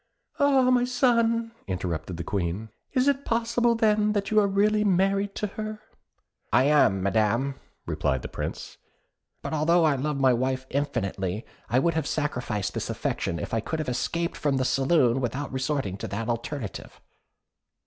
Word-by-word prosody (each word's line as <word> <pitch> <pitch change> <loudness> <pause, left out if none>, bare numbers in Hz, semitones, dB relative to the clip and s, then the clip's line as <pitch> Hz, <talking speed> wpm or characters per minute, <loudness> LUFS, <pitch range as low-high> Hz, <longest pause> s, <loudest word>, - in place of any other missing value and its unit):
"Ah, 270 -3 +4
my 245 -1 +4
son," 230 -2 +2 0.2
interrupted 90 -2 -3
the 85 - -4
Queen, 95 +4 -2 0.2
"is 255 0 +2
it 280 0 +2
possible, 235 0 +1
then, 215 -2 +2
that 200 -1 -1
you 215 - +5
are 205 - +3
really 210 +2 +2
married 195 +1 +1
to - - -2
her?" 215 +1 -5 0.7
"I - - +5
am, 135 -10 +4
Madam," 115 +7 +1 0.3
replied 65 -1 -1
the - - -4
Prince; - - -6 0.6
"but - - -4
although 165 +3 +3
I 155 -3 +4
love 140 +1 -2
my 130 -2 +5
wife 130 +2 -1
infinitely, 105 -8 -2 0.2
I 120 - +2
would 170 +6 +2
have 160 -2 -1
sacrificed 120 -9 -2
this - - -3
affection 85 - -2
if - - -5
I 115 - +2
could 160 +9 -3
have 155 - -3
escaped 170 +7 -2
from 140 -2 0
the 130 - 0
saloon 135 -2 +3
without 130 +4 -3
resorting 130 -7 -1
to - - -5
that 105 +4 -4
alternative." 120 -1 -5
145 Hz, 165 wpm, -26 LUFS, -, 0.7 s, you